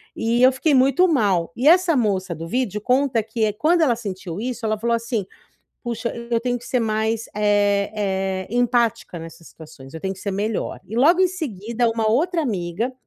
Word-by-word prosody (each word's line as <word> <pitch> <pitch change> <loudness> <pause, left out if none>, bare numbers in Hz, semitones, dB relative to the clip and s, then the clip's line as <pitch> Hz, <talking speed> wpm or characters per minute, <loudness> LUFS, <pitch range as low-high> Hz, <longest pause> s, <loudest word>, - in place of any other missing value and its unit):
E 230 +2 0
eu 260 - +7
fiquei 280 +3 0
muito 270 +7 +4
mal, 200 - +1
e 255 +5 0
essa 350 -1 +4
moça 190 -7 0
do 165 +2 -7
vídeo 210 0 -2
conta 255 0 +2
que 220 0 -1
é 210 - -1
quando 325 +10 +2
ela 255 -7 +3
sentiu 190 -4 -6
isso 240 -1 -4
ela 215 0 0
falou 235 +1 +1
assim: 230 -3 -3 0.6
"Puxa 235 0 -3 0.2
eu 230 - +2
tenho 245 0 -1
que 240 - -13
ser 250 - 0
mais, 220 0 -1
é 205 -1 +2
é, 190 -2 -2
empática 240 -6 0
nessas 165 0 -11
situações, 150 -4 -14
eu 160 - -7
tenho 190 +2 -2
que 190 - -16
ser 200 -1 -3
melhor". 205 +2 -3
E 220 - -6
logo 325 +9 +5
em 375 - +4
seguida 235 - -2
uma 225 -1 0
outra 330 - +1
amiga, 205 - -2
225 Hz, 195 wpm, -22 LUFS, 200-250 Hz, 0.6 s, eu